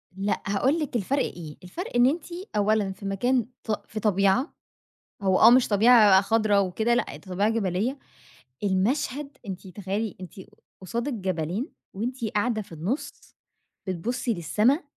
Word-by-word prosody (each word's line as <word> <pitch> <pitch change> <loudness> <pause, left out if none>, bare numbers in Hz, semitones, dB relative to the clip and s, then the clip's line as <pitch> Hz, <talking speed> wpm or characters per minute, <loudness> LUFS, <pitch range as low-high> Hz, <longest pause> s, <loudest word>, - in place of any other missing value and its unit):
لأ 200 +1 -1
هاقول 265 +11 +1
لِك 295 -5 -3
الفرق 260 +6 +1
إيه، 155 -4 -7
الفرق 285 - -7
إن 245 0 +6
أنتِ 300 +4 +1 0.3
أولًا 210 -1 +2
في 195 +1 -10
مكان 240 +5 +1 0.2
ط 215 -2 -3
في 215 - -5
طبيعة، 200 - +2 0.7
هو 190 -1 +2
آه - - +9
مش 250 +1 +5
طبيعة 210 -2 +6
خضرا 210 0 +2
وكده، 210 +5 +1
لأ - - -1
طبيعة 195 +3 -1
جبلية، 220 +4 -1 0.7
المشهد 265 +9 -1
أنتِ 190 0 -6
تخيلي 200 +3 -4
أنتِ 185 - -9 0.5
قصادِك 235 +9 -3
جبلين 185 - -2 0.3
وأنتِ 235 +4 -3
قاعدة 215 +1 0
في 190 - -14
النُص 175 - -5 0.5
بتبصّي 235 +7 -2
للسما، 210 - +1
210 Hz, 140 wpm, -26 LUFS, 190-245 Hz, 0.7 s, آه